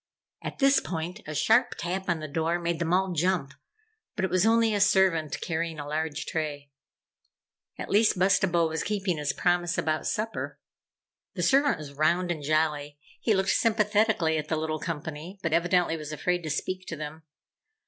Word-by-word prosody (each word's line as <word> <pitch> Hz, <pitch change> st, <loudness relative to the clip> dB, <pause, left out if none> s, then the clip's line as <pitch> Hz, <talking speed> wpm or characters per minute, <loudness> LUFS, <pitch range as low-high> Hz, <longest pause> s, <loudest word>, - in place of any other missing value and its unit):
At -, -, -6 dB
this 275 Hz, 0 st, +5 dB
point 175 Hz, +4 st, -5 dB
a 155 Hz, -, -5 dB
sharp 225 Hz, -, +3 dB
tap 180 Hz, +3 st, -3 dB
on 170 Hz, -2 st, +1 dB
the 155 Hz, -, -5 dB
door 165 Hz, +3 st, 0 dB
made 170 Hz, -1 st, -2 dB
them 170 Hz, -1 st, -1 dB
all 190 Hz, +1 st, +2 dB
jump, 170 Hz, -4 st, 0 dB, 0.6 s
but 190 Hz, -, 0 dB
it 185 Hz, -, -4 dB
was 185 Hz, +3 st, +3 dB
only 225 Hz, -1 st, +4 dB
a 205 Hz, -, +1 dB
servant 190 Hz, -7 st, +3 dB
carrying 165 Hz, -1 st, -2 dB
a 145 Hz, -, -6 dB
large 155 Hz, 0 st, -2 dB
tray. 145 Hz, -3 st, -4 dB, 1.1 s
At -, -, -5 dB
least, 210 Hz, 0 st, +4 dB
Bustabo 180 Hz, -2 st, +3 dB
was 160 Hz, 0 st, -2 dB
keeping 195 Hz, -5 st, -1 dB
his 145 Hz, -1 st, 0 dB
promise 175 Hz, -1 st, 0 dB
about 155 Hz, 0 st, -1 dB
supper. 225 Hz, +1 st, -3 dB, 0.8 s
The -, -, -2 dB
servant 280 Hz, +1 st, +4 dB
was 145 Hz, -2 st, -9 dB
round 170 Hz, +5 st, +1 dB
and 160 Hz, -3 st, -3 dB
jolly. 150 Hz, -1 st, 0 dB, 0.2 s
He 220 Hz, -, +2 dB
looked 190 Hz, 0 st, +2 dB
sympathetically 210 Hz, -7 st, +2 dB
at 155 Hz, -, -5 dB
the 160 Hz, -, -1 dB
little 155 Hz, 0 st, -2 dB
company, 160 Hz, +3 st, -6 dB
but 165 Hz, -2 st, 0 dB
evidently 175 Hz, 0 st, +2 dB
was 155 Hz, -1 st, -7 dB
afraid 180 Hz, +3 st, -1 dB
to 160 Hz, -, -5 dB
speak 185 Hz, +5 st, -3 dB
to 165 Hz, -, -4 dB
them. 155 Hz, +1 st, -7 dB
170 Hz, 180 wpm, -27 LUFS, 155-190 Hz, 1.1 s, this